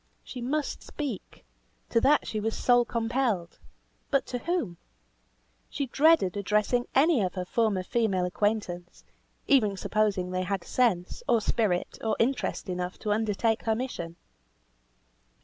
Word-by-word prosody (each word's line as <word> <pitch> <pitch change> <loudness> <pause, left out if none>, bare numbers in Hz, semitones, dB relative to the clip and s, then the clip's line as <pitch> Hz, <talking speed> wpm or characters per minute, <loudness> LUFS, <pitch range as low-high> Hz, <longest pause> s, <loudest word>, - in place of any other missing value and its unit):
She 250 - -8
must 285 +4 -2
speak; 275 - -6 0.4
to 230 - +2
that 290 +3 +4
she 215 - -3
was 220 +1 -2
soul 245 -1 +4
compelled; 230 -6 -1 0.5
but 275 -2 +2
to 245 - -4
whom? 285 - -2 0.9
She 280 - -2
dreaded 275 - +4
addressing 210 +5 +1
any 285 -1 +5
of 185 -1 -1
her 180 -1 -3
former 210 -2 +1
female 195 -4 +1
acquaintance, 180 -2 -2 0.4
even 215 -8 +3
supposing 200 -3 0
they 185 0 -1
had 185 -1 -2
sense, 190 - 0
or 230 - +5
spirit, 205 -4 0
or 220 -1 +1
interest 245 -2 0
enough 180 0 -3
to 210 - -3
undertake 220 +1 0
her 220 -1 +2
mission. 195 -9 -4
220 Hz, 135 wpm, -28 LUFS, 185-245 Hz, 0.9 s, any